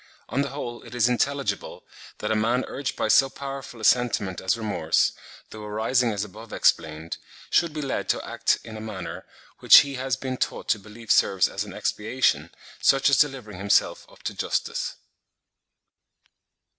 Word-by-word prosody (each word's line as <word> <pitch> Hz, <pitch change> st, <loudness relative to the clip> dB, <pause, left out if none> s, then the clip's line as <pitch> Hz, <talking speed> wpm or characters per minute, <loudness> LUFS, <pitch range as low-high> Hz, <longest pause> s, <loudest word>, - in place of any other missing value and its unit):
On 125 Hz, +6 st, 0 dB
the 140 Hz, -, -2 dB
whole 120 Hz, -3 st, -6 dB
it 120 Hz, +1 st, -11 dB
is 120 Hz, -1 st, +3 dB
intelligible, 140 Hz, +3 st, -1 dB, 0.3 s
that 105 Hz, -, -3 dB
a -, -, +2 dB
man 115 Hz, +4 st, +1 dB
urged 135 Hz, 0 st, -4 dB
by -, -, -1 dB
so 135 Hz, -1 st, +5 dB
powerful 135 Hz, -3 st, -7 dB
a -, -, -10 dB
sentiment 110 Hz, -6 st, +2 dB
as 95 Hz, +4 st, +1 dB
remorse, 100 Hz, -8 st, +1 dB, 0.4 s
though 110 Hz, -1 st, -9 dB
arising 115 Hz, +3 st, +1 dB
as 100 Hz, -1 st, -2 dB
above 110 Hz, +2 st, -11 dB
explained, 80 Hz, 0 st, 0 dB, 0.3 s
should 170 Hz, -2 st, +3 dB
be 150 Hz, 0 st, -4 dB
led 135 Hz, -, -3 dB
to -, -, 0 dB
act -, -, +1 dB
in 110 Hz, -, -9 dB
a 110 Hz, -, -7 dB
manner, 105 Hz, -5 st, -7 dB, 0.3 s
which -, -, +9 dB
he 140 Hz, -1 st, -5 dB
has 130 Hz, 0 st, -1 dB
been 130 Hz, -1 st, -4 dB
taught -, -, -3 dB
to 110 Hz, -, +2 dB
believe 110 Hz, +2 st, -7 dB
serves 95 Hz, -2 st, +4 dB
as -, -, -4 dB
an -, -, -9 dB
expiation, 125 Hz, +5 st, 0 dB, 0.3 s
such 135 Hz, +1 st, +4 dB
as 135 Hz, -, +5 dB
delivering 125 Hz, -10 st, 0 dB
himself 100 Hz, +1 st, +1 dB
up -, -, -19 dB
to -, -, -3 dB
justice. -, -, -2 dB
115 Hz, 170 wpm, -25 LUFS, 105-135 Hz, 0.4 s, which